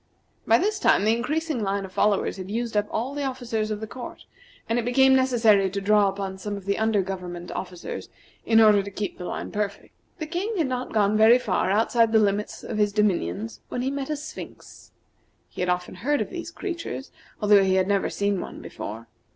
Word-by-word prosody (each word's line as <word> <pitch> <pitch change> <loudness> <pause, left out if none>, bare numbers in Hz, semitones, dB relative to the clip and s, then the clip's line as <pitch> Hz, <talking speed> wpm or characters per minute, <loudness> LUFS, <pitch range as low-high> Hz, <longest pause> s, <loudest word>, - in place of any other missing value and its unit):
By 225 - +6
this 415 - 0
time 205 - +3
the 220 +1 +4
increasing 300 +2 -2
line 200 -1 -1
of 190 - -11
followers 200 +1 +1
had 190 0 -7
used 230 +1 -3
up 210 0 +2
all 250 +5 -2
the 290 0 -3
officers 245 -5 -2
of 210 0 -3
the - - -3
court, 245 +3 -9 0.4
and 230 +2 +1
it - - -1
became 265 +2 +5
necessary 225 -7 +4
to 200 +2 -3
draw 205 0 +4
upon 195 -1 -5
some 205 +1 -4
of 195 - -10
the 200 0 0
under 220 -3 +2
government 180 -2 -6
officers 180 -2 -6 0.3
in 225 -1 +4
order 210 -2 +6
to 200 - -7
keep 200 0 -5
the 180 - -5
line - - -5
perfect. 205 -1 -4 0.2
The 315 - -4
King 375 +7 -3
had 325 - +2
not 255 -1 -3
gone 210 -1 +2
very 220 +3 +7
far 210 -7 0
outside 225 +2 +3
the - - +6
limits 205 0 0
of 215 - -4
his 205 -1 +3
dominions 115 - 0
when 245 - -3
he 265 - 0
met 280 0 -4
a 305 - 0
Sphinx. 300 +1 -10 0.6
He - - -7
had 180 - 0
often 180 0 -1
heard 275 +11 0
of - - -3
these 345 -2 -5
creatures, 335 -6 -5 0.3
although 205 -2 +5
he 190 -1 +2
had 190 0 +2
never 200 -1 +1
seen 200 -2 -1
one - - -8
before. 110 +3 -7
215 Hz, 215 wpm, -25 LUFS, 195-250 Hz, 0.6 s, very